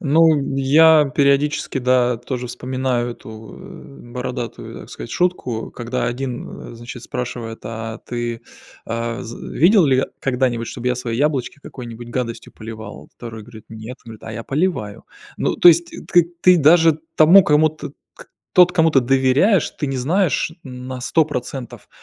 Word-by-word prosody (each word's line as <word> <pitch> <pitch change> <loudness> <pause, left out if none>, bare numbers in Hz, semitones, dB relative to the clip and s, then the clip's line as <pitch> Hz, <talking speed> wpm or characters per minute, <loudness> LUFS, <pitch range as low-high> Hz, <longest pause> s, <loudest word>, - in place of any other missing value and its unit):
Ну, 155 -2 +3
я 150 +3 +6
периодически, 140 0 +1
да, 125 -1 +2
тоже 125 0 -5
вспоминаю 125 0 -2
эту, 110 -1 -11
э, 120 -3 -13
бородатую, 125 -2 -6
так - - -13
сказать, 115 - -8
шутку, 150 -11 -1
когда 120 +1 -3
один, 125 -1 -5
э, - - -11
значит 120 +1 -9
спрашивает: 120 -3 -5
"А 115 0 -6
ты, 120 -1 -5 0.4
а, 115 0 -4
з 115 +1 -8 0.2
видел 180 0 +5
ли 130 -1 +3 0.2
когда-нибудь, 125 -3 0
чтобы 125 0 -4
я 125 - +1
свои 120 -2 -4
яблочки 145 -1 -1
какой-нибудь 120 -2 -9
гадостью 120 -2 -4
поливал?" 110 -1 -10
Второй 115 -2 -8
говорит: 110 0 -13
"Нет". 110 +3 -9
Он 115 - -11
говорит: 110 - -12
"А 110 - -7
я 115 +1 -6
поливаю". 140 - -2 0.3
Ну, - - 0
то 175 - +7
есть, 170 +1 +5
т - - -9
т 175 0 +5
к - - -16
ты 180 -1 +7
даже 160 +1 +5 0.2
тому 175 +5 +8
кому, 155 0 +4
т 155 - -8 0.3
к - - -14 0.3
тот, 180 0 +6
кому 165 -2 +3
ты 135 - +4
доверяешь, 135 - +3
ты 145 - -4
не 135 -1 -3
знаешь, 160 +4 0
м, 125 -1 -9
на 130 -1 -5
100 155 +5 +2
процентов, 125 -3 -6
125 Hz, 170 wpm, -20 LUFS, 120-150 Hz, 0.4 s, тому